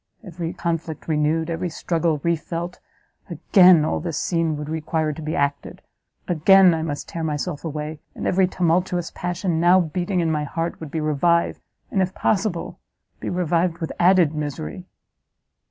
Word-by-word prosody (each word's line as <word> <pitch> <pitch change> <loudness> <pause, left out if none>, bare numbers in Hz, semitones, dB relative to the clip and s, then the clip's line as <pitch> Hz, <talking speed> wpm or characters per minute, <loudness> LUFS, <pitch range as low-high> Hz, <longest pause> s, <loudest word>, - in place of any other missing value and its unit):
every 170 -4 -5
conflict 165 -2 -4
renewed, 155 +1 +1
every 170 +1 -2
struggle 165 -1 -1
re 170 0 +2
felt, 170 +2 -6 0.5
again 180 -5 +5
all - - -1
this 165 -3 -4
scene 165 -3 0
would 150 0 -6
require 155 0 -1
to 160 - -9
be 155 +1 -3
acted, 140 0 -2 0.5
again 180 +2 +6
I 160 - -1
must 150 -3 -4
tear 165 - -5
myself 150 +1 -3
away, 150 -1 -5 0.2
and - - -5
every 185 0 +3
tumultuous 175 0 0
passion 175 -1 -2
now 175 +2 +5
beating 180 +3 -1
in 165 -2 +1
my 150 -1 0
heart 165 +3 -3
would 160 - -7
be 160 - -3
revived, 155 +3 +1 0.3
and, 195 -6 +1
if 185 0 -1
possible, 195 -4 -1 0.4
be - - -4
revived 175 -1 0
with 165 -2 -4
added 175 -3 +4
misery! 155 +4 -5
165 Hz, 160 wpm, -22 LUFS, 155-180 Hz, 0.5 s, again